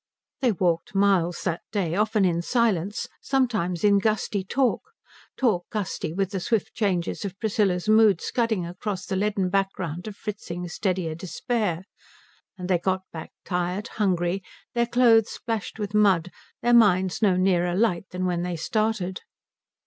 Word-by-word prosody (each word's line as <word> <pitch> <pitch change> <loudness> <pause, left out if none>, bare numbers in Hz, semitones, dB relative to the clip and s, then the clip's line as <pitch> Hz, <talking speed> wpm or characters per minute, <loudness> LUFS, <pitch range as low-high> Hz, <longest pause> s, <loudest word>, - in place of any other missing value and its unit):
They 250 -3 +3
walked 175 -1 0
miles 190 -3 +2
that 170 -2 -1
day; 185 -7 -1
often 210 +1 +2
in 170 -2 +1
silence, 210 -1 0
sometimes 220 -11 0
in 200 -1 +5
gusty 210 -1 0
talk 255 +6 +1 0.6
talk 210 -9 +1
gusty 205 -7 -3
with 195 +3 -1
the 195 - -2
swift 210 +4 -1
changes 190 -3 -1
of 195 -1 -6
Priscilla's 205 -4 0
mood 215 -4 +5
scudding 225 -5 -1
across 185 +2 -5
the 190 - -3
leaden 195 -2 0
background 185 -3 -2
of 210 - -6
Fritzing's 180 -5 -6
steadier 185 -5 -1
despair 185 +1 -2 0.7
and 180 -1 -5
they 180 -2 +2
got 190 +1 -1
back 160 -1 -7
tired, 180 +4 -2
hungry, 185 -2 0 0.3
their 235 0 +1
clothes 230 -3 +4
splashed 225 -2 -4
with 205 -1 -4
mud, 190 -5 +3 0.3
their 240 0 +3
minds 190 -4 +4
no 195 -4 +4
nearer 180 -2 +2
light 195 -3 +1
than 185 0 -3
when 175 -1 0
they 175 0 -2
started. 200 +1 -1
195 Hz, 150 wpm, -25 LUFS, 180-215 Hz, 0.7 s, in